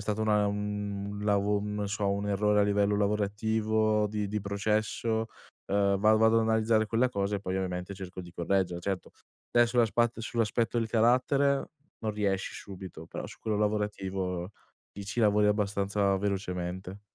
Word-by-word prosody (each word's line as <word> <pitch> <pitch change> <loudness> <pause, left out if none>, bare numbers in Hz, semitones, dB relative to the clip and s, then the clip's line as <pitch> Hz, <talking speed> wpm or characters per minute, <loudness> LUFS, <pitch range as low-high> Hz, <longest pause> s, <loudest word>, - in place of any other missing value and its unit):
stato 105 +1 -2
una 105 -1 +3
un 100 0 -3
lavo 105 0 +2
non 105 -1 -3
so, 100 -1 0
un 100 +1 -2
errore 105 +1 +2
a - - +5
livello 100 0 +2
lavorativo 105 +1 +1
di 105 -1 -2
di 105 0 -2
processo, 110 +2 -1 0.5
uhm, 100 -1 +3
va 110 +2 +5
vado 110 +1 +4
ad 115 - +4
analizzare 110 0 +2
quella 120 +4 +2
cosa 100 -3 -1
e - - -6
poi 95 -1 -3
ovviamente 90 0 -3
cerco 95 -1 -8
di 90 -1 -10
correggere, 90 0 0
certo 95 0 -3 0.4
adesso 120 -1 +5
sull'aspatt 120 -1 +2
sull'aspetto 115 0 0
del 115 - -1
carattere 130 +5 +2 0.3
non 110 -1 -2
riesci 100 -2 -1
subito, 95 -4 -9
però - - -6
su - - -12
quello 110 -2 -1
lavorativo, 95 -4 -2 0.4
lì 100 - -8
ci 105 +4 -2
lavori 105 -1 +4
abbastanza 100 -1 +1
velocemente. 95 -1 -3
105 Hz, 160 wpm, -29 LUFS, 100-110 Hz, 0.5 s, a